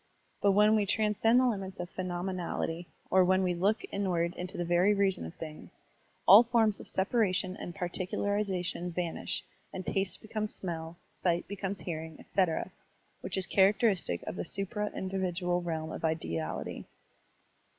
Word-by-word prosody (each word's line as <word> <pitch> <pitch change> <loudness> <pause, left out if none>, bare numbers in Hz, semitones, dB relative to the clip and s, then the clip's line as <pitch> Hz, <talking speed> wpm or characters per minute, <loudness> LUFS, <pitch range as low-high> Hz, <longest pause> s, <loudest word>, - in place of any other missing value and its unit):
But 200 -1 +4
when 210 +2 +5
we 210 -2 +2
transcend 220 +3 +3
the 255 - +4
limits 195 -6 -2
of 175 0 -5
phenomenality, 175 -2 -3 0.2
or 190 0 +6
when 185 +1 +3
we 180 -1 +1
look 195 +6 +1
inward 175 -4 0
into 180 0 -6
the 175 - -1
very 175 +4 +4
reason 195 - +1
of 80 - -11
things, 155 -1 -9 0.5
all 200 +4 +10
forms 230 -3 +2
of - - -8
separation 190 -2 +1
and 175 -4 -7
particulariza 185 +1 -1
tion 180 0 -3
vanish, 170 -1 -3 0.3
and 185 - -6
taste 195 -1 0
becomes 215 -1 0
smell, 165 -2 -5
sight 175 -1 -1
becomes 195 -2 -4
hearing, 160 -1 -5
etc., 185 -5 0 0.5
which - - -3
is 190 - -1
characteristic 195 - +2
of - - -5
the - - -2
supra 205 +4 -2
individual 180 -2 -1
realm 160 -2 -3
of - - -7
ideality. 85 - -2
185 Hz, 150 wpm, -31 LUFS, 175-200 Hz, 0.5 s, all